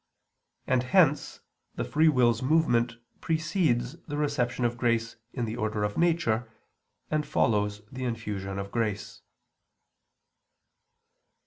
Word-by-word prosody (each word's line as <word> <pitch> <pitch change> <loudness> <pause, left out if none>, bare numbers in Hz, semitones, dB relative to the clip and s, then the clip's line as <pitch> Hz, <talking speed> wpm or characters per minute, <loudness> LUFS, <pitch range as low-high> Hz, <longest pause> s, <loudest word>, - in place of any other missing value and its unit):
And 130 -1 +2
hence 150 +2 +2 0.3
the - - -2
free 155 +2 +3
will's 120 -5 +3
movement 125 -5 +2 0.3
precedes 155 -7 0
the 145 -1 -4
reception 130 -5 0
of 120 0 0
grace 115 -1 0 0.2
in 120 -3 -2
the 110 0 -4
order 105 -1 -1
of 105 0 -1
nature, 160 -10 +1 0.6
and 155 -1 +1
follows 105 -5 0
the 130 0 -5
infusion 105 -5 -4
of 100 0 -5
grace. 105 -2 -2
120 Hz, 115 wpm, -28 LUFS, 110-150 Hz, 0.6 s, free